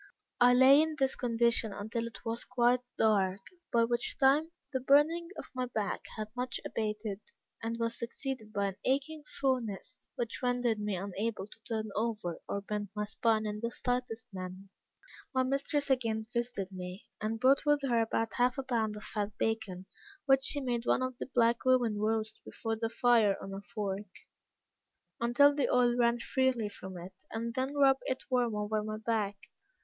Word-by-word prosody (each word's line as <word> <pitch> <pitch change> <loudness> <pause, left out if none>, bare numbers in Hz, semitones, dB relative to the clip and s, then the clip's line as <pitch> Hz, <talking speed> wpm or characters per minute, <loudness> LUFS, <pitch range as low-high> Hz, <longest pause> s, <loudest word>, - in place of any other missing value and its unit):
I 245 0 +7
lay 265 +3 +8
in 315 0 0
this 270 -2 +2
condition 235 -2 +1
until 220 +4 -3
it 230 - -12
was 230 +1 -2
quite 250 0 +3 0.2
dark, 195 -3 +2 0.3
by 230 -1 +4
which 235 +1 0
time 285 +4 +4 0.2
the 260 - +1
burning 295 +6 +4
of - - -6
my 255 -1 -2
back 215 -4 -2
had 215 0 -4
much 250 0 -2
abated, 210 -2 -3 0.4
and 230 +1 -3
was 230 0 -2
succeeded 235 -2 -5
by 200 -1 0
an 190 - -9
aching 285 +4 0
soreness, 255 -2 -2
which 235 -2 -3
rendered 245 -3 +1
me 210 -1 -1
unable 200 +3 -3
to 215 - -16
turn 220 -2 -2
over 215 -6 -2
or 200 - -1
bend 205 0 -4
my 210 0 -1
spine 220 +1 +1
in 210 0 -3
the 230 +1 -2
slightest 245 -2 -2
manner. 185 +1 -7 0.7
My 260 - +4
mistress 275 +2 0
again 225 -4 +1
visited 235 -5 -2
me, 180 +1 -7 0.2
and 220 +1 -2
brought 265 +3 +4
with 295 -1 +3
her 240 -4 +2
about 225 0 -1
half 250 +2 +2
a 270 - -2
pound 225 -4 0
of 210 - -8
fat 210 -1 -3
bacon, 220 -5 -2 0.4
which 270 -1 +4
she 290 - +2
made 240 -2 -2
one - - +3
of 255 0 -2
the - - -4
black 235 -1 +3
women 245 -5 +3
roast 220 0 -1
before 225 -1 -3
the 225 0 -2
fire 230 -4 +4
on 195 - -7
a 195 - -5
fork, 205 -1 -4 1.1
until 240 +5 +5
the 285 -2 +1
oil 245 -1 +4
ran 240 -1 +3
freely 255 -4 +1
from 190 -2 -9
it, 180 +2 -9 0.2
and 230 +1 -3
then 265 +3 -2
rub 275 -2 +5
it 260 - -2
warm 245 -3 +2
over 210 +1 -1
my 215 0 -4
back. 215 -2 -1
230 Hz, 180 wpm, -32 LUFS, 210-255 Hz, 1.1 s, lay